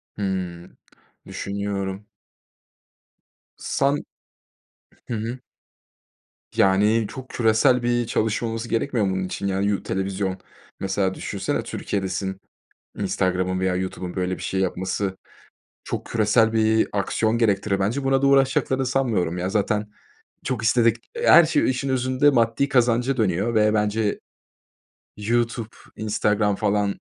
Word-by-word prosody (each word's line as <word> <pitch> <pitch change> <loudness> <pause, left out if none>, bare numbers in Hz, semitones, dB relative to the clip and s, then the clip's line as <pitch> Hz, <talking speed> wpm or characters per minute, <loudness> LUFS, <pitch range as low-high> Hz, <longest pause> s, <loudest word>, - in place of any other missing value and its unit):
Hımm. 90 -4 -4 0.5
Düşünüyorum. 100 0 -4 1.5
San 140 +1 0 1.0
Hı - - -4
hı. 115 +4 -4 1.2
Yani, 105 +4 +3
çok 130 +3 -9
küresel 120 +2 +3
bir 120 -1 +1
çalışma 110 +1 0
olması 115 +1 -4
gerekmiyor 115 -2 0
mu 95 - 0
bunun 95 - -1
için, 100 +2 -4
yani, 95 +1 0
yu 100 -2 0
televizyon 95 0 -2 0.4
mesela 95 0 0
düşünsene - - -3
Türkiye'desin, 95 -1 -3 0.6
Instagram'ın 95 -2 0
veya 95 -1 0
YouTube'un, 90 -1 -4
böyle, 90 0 -1
bir - - -10
şey 95 - -2
yapması 95 +1 -2 0.7
çok - - -4
küresel 110 0 +2
bir 110 0 +3
aksiyon 110 +3 0
gerektirir 100 -3 +1
bence. 110 +8 0
Buna 135 0 +2
da 140 - +3
uğraşacaklarını 135 -1 +2
sanmıyorum, 115 -10 0
ya, 90 +1 -2
zaten 105 +1 0 0.6
çok 125 -4 -2
istedik 115 0 +3 0.2
her 170 - +7
şey 155 -4 +2
işin 130 +1 -2
özünde 130 +2 +2
maddi 115 +2 +2
kazanca 125 +1 +2
dönüyor 105 +1 0
ve 105 0 +4
bence 105 0 0 1.0
YouTube, 115 +1 -1 0.3
Instagram, 105 -1 +1
falan, 105 -1 +1
105 Hz, 120 wpm, -23 LUFS, 95-120 Hz, 1.5 s, her